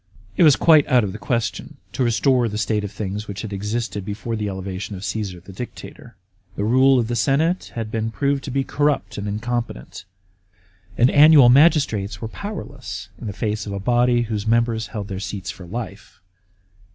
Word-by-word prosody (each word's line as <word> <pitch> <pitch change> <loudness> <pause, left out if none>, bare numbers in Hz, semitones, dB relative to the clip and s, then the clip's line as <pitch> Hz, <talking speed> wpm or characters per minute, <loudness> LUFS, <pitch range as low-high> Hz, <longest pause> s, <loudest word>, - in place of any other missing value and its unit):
It - - 0
was 150 -5 +7
quite 155 -3 +5
out 125 -4 +4
of 100 - -2
the 105 - -8
question 120 -2 -3 0.2
to 130 - 0
restore 120 +1 +2
the 105 - -4
state 105 0 0
oi - - -2
things 105 +1 -5
which 100 -1 -6
had 105 -2 -6
existed 105 +1 -3
before 105 +4 -4
the 105 -2 -2
elevation 95 +1 -5
of 95 +1 -7
Caesar, 95 -2 -4
the 95 +2 -13
Dictator. 120 +6 -9 0.4
The 100 - -2
rule 130 +4 +4
of 120 -3 +1
the 120 - -2
senate 150 - +1
had 115 -2 -4
been 110 0 -1
proved 140 +4 -1
to - - -5
be 135 +1 0
corrupt 145 -5 -1
and 100 - -4
incompetent, 115 - -4 0.9
and 120 +2 +4
annual 145 -4 +7
magistrates 125 - +3
were 110 - -4
powerless 125 - -7
in 115 - -7
the - - -3
face 105 +1 -3
of 100 - -4
a 100 - -3
body 120 +3 +2
whose 110 -2 -4
members 115 0 +1
held 105 -3 -6
their 95 -2 -5
seats 100 -1 -5
for 90 -4 -12
life. 105 0 -7
110 Hz, 190 wpm, -21 LUFS, 100-125 Hz, 0.9 s, was